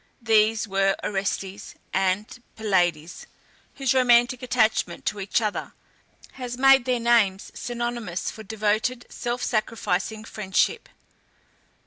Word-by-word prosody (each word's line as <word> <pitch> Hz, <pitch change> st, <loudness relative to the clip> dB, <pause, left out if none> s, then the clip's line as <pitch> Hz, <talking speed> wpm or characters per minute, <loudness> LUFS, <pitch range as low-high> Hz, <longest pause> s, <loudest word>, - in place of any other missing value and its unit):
These 220 Hz, -1 st, +3 dB
were 195 Hz, 0 st, +2 dB
Orestes 195 Hz, 0 st, -3 dB, 0.2 s
and 190 Hz, +5 st, -1 dB
Pylades, 175 Hz, -6 st, 0 dB, 0.5 s
whose 270 Hz, -2 st, +1 dB
romantic 245 Hz, -1 st, +4 dB
attachment 235 Hz, -3 st, 0 dB
to 210 Hz, -, -1 dB
each 195 Hz, +4 st, 0 dB
other 210 Hz, -1 st, -3 dB, 0.6 s
has 245 Hz, -2 st, -6 dB
made 270 Hz, -1 st, +6 dB
their 250 Hz, -2 st, +1 dB
names 225 Hz, -5 st, +2 dB
synonymous 240 Hz, -6 st, -4 dB
for 220 Hz, -, -10 dB
devoted 220 Hz, +4 st, -1 dB
self 240 Hz, +1 st, -3 dB
sacrificing 215 Hz, -2 st, -1 dB
friendship. 215 Hz, -, -1 dB
220 Hz, 105 wpm, -24 LUFS, 195-240 Hz, 0.6 s, made